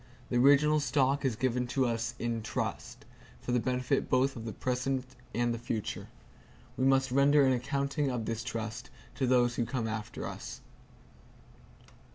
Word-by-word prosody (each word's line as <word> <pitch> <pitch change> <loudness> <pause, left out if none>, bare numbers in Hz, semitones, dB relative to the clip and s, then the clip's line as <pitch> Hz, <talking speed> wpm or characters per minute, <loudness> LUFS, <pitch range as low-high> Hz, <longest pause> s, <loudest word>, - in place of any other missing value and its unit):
The 120 - +2
original 145 +4 +5
stock 140 -1 +1
is 130 -4 +1
given 125 +1 0
to 130 +1 +1
us 115 0 -1
in 115 -1 -2
trust, 110 - -4 0.3
for - - -4
the 125 - +3
benefit 125 +2 0
both 130 +1 +2
of 115 -2 -7
the 110 - -3
present 125 +2 -1 0.3
and 120 0 +1
the 115 - -4
future. 115 -2 -4 0.7
We 130 - 0
must 135 -1 +3
render 140 +2 +5
an 130 - +4
accounting 140 +3 -1
of 120 -3 -2
this 115 +1 -3
trust 115 -2 -5 0.2
to 130 - -1
those 120 -1 +3
who 120 - +2
come 125 -5 -2
after 110 -1 -4
us. - - -7
125 Hz, 165 wpm, -31 LUFS, 115-135 Hz, 0.7 s, original